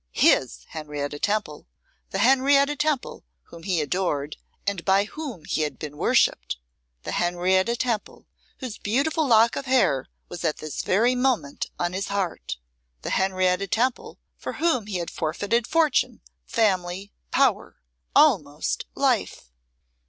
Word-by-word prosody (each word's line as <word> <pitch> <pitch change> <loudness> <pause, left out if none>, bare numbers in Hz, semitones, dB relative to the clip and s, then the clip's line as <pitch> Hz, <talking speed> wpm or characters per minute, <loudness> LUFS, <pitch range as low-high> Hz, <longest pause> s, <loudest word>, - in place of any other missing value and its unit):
His - - +3
Henrietta 145 -2 -5
Temple, 205 - -2 0.4
the - - -3
Henrietta 275 +5 +4
Temple 300 -3 -1 0.2
whom 170 - -13
he 175 0 0
adored, 150 -3 -1 0.3
and 200 -4 -1
by 195 +1 +4
whom 245 - -7
he - - -1
had 150 -1 -2
been 150 -2 -7
worshipped! 145 - +2 0.5
The - - -4
Henrietta 185 +5 +1
Temple 235 -3 -3 0.3
whose 255 -6 -7
beautiful 285 +8 +1
lock 230 -1 +5
of 270 - -4
hair 195 - +2 0.2
was 175 -1 -7
at 155 -3 0
this 155 -1 -5
very 230 +7 +3
moment 250 - 0
on 175 0 -1
his 190 +1 -2
heart! 195 - -3 0.5
The - - -3
Henrietta 185 0 +1
Temple 240 +6 -1 0.2
for - - -5
whom 310 -10 +1
he 200 -3 -2
had 170 -1 -4
forfeited 205 +9 -1
fortune, 325 -2 +2 0.3
family, 195 -3 0 0.2
power, - - +2 0.4
almost - - +3
life! - - 0
195 Hz, 135 wpm, -25 LUFS, 170-245 Hz, 0.5 s, lock